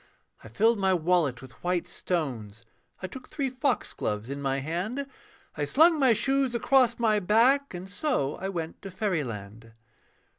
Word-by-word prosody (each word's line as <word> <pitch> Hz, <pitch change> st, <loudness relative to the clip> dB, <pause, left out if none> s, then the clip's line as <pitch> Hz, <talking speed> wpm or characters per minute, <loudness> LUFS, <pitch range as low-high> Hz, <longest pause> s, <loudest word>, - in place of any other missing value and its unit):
I -, -, -10 dB
filled 220 Hz, -, +2 dB
my 190 Hz, -1 st, +3 dB
wallet 160 Hz, -7 st, +1 dB
with 130 Hz, -, -15 dB
white 175 Hz, -1 st, 0 dB
stones, 120 Hz, -, -4 dB, 0.4 s
I -, -, -1 dB
took 250 Hz, +7 st, -9 dB
three 275 Hz, -3 st, -2 dB
foxgloves 225 Hz, -, -2 dB
in 140 Hz, 0 st, -5 dB
my 135 Hz, -1 st, 0 dB
hand, 180 Hz, -, -3 dB, 0.5 s
I 150 Hz, -, -1 dB
slung 320 Hz, -, +5 dB
my 260 Hz, -4 st, +5 dB
shoes 270 Hz, +1 st, +1 dB
across 245 Hz, 0 st, +3 dB
my 220 Hz, -3 st, +2 dB
back, 235 Hz, +6 st, +3 dB
And 180 Hz, +2 st, -7 dB
so 200 Hz, -, -1 dB
I 190 Hz, -, -4 dB
went 165 Hz, -4 st, -5 dB
to 195 Hz, -, -7 dB
fairyland. 115 Hz, -, -4 dB
185 Hz, 155 wpm, -27 LUFS, -, 0.5 s, slung